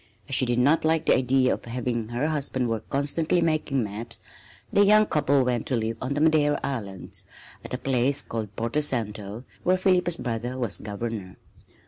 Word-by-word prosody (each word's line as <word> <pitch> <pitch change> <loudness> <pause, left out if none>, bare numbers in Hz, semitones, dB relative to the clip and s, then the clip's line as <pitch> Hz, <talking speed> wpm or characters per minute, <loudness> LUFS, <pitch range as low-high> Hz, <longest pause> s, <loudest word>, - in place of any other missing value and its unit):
As 135 - -6
she 130 -1 +5
did 120 0 +1
not 145 +6 +3
like 160 0 +2
the - - +5
idea 130 0 +3
of - - -6
having 120 -1 -3
her 120 +4 -1
husband 140 -5 -1
work 110 -1 -3
constantly 150 +5 +1
making 155 -6 +1
maps, 105 +2 -5 0.5
the 205 - +6
young 215 +1 +6
couple 140 -6 +2
went 125 -2 -1
to 130 - 0
live 115 0 -2
on 130 +2 -2
the 145 - 0
Madeira 155 -2 +3
Islands 105 -9 -5 0.4
at - - -5
a - - -2
place 135 +2 +1
called 110 -3 -5
Porto 115 +7 -1
Santo, 110 -5 -2 0.2
where 185 +1 +2
Philippa's 180 -2 +2
brother 120 +1 -3
was 120 -6 0
Governor. 105 -2 -5
130 Hz, 180 wpm, -26 LUFS, 115-150 Hz, 0.5 s, the